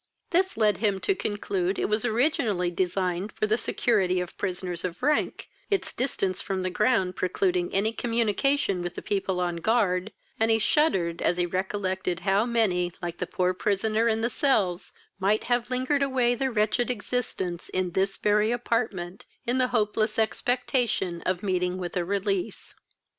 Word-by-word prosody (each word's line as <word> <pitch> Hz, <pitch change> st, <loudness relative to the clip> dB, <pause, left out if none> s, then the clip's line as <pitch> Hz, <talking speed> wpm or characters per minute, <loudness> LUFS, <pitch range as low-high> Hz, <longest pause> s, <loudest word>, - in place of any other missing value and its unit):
This 375 Hz, +2 st, +2 dB
led 210 Hz, -4 st, +3 dB
him 205 Hz, -3 st, +1 dB
to 395 Hz, -, +2 dB
conclude 200 Hz, -, -2 dB
it -, -, 0 dB
was 215 Hz, +3 st, 0 dB
originally 220 Hz, -, +1 dB
designed 180 Hz, +2 st, -1 dB
for -, -, 0 dB
the 215 Hz, +1 st, +2 dB
security 200 Hz, -5 st, +1 dB
of 180 Hz, -1 st, -5 dB
prisoners 180 Hz, -2 st, -3 dB
of 175 Hz, +4 st, -5 dB
rank, 300 Hz, +2 st, +1 dB, 0.2 s
its 400 Hz, -2 st, -1 dB
distance 195 Hz, -7 st, -1 dB
from 190 Hz, -2 st, -2 dB
the 185 Hz, -, -1 dB
ground 190 Hz, -3 st, +2 dB
precluding 180 Hz, -1 st, 0 dB
any 205 Hz, +3 st, +1 dB
communication 230 Hz, -2 st, +1 dB
with 175 Hz, 0 st, -4 dB
the -, -, -6 dB
people 195 Hz, -2 st, -1 dB
on 175 Hz, -1 st, -1 dB
guard; 200 Hz, 0 st, +1 dB, 0.3 s
and 225 Hz, 0 st, +3 dB
he 225 Hz, -, +4 dB
shuddered 195 Hz, -, +1 dB
as 175 Hz, -, +2 dB
he 175 Hz, -, +2 dB
recollected 185 Hz, -1 st, -2 dB
how 200 Hz, +4 st, +2 dB
many, 185 Hz, -7 st, +1 dB
like 175 Hz, -2 st, -5 dB
the 180 Hz, -, -2 dB
poor 180 Hz, 0 st, 0 dB
prisoner 215 Hz, +4 st, +1 dB
in 225 Hz, -1 st, +1 dB
the 235 Hz, -, +1 dB
cells, 200 Hz, -10 st, +1 dB, 0.3 s
might 205 Hz, +3 st, +2 dB
have 245 Hz, 0 st, 0 dB
lingered 260 Hz, +3 st, +1 dB
away 260 Hz, -3 st, +2 dB
their 265 Hz, +2 st, -1 dB
wretched 225 Hz, +1 st, +1 dB
existence 210 Hz, -7 st, -3 dB
in 185 Hz, -1 st, -1 dB
this 195 Hz, +2 st, 0 dB
very 210 Hz, +1 st, +2 dB
apartment, 215 Hz, -7 st, -2 dB, 0.2 s
in 245 Hz, +2 st, +1 dB
the 255 Hz, -, +4 dB
hopeless 215 Hz, -2 st, 0 dB
expectation 225 Hz, -6 st, 0 dB
of 185 Hz, 0 st, -1 dB
meeting 180 Hz, -2 st, 0 dB
with 180 Hz, 0 st, -5 dB
a 180 Hz, -, +1 dB
release. 200 Hz, +1 st, -2 dB
200 Hz, 165 wpm, -27 LUFS, 180-235 Hz, 0.3 s, he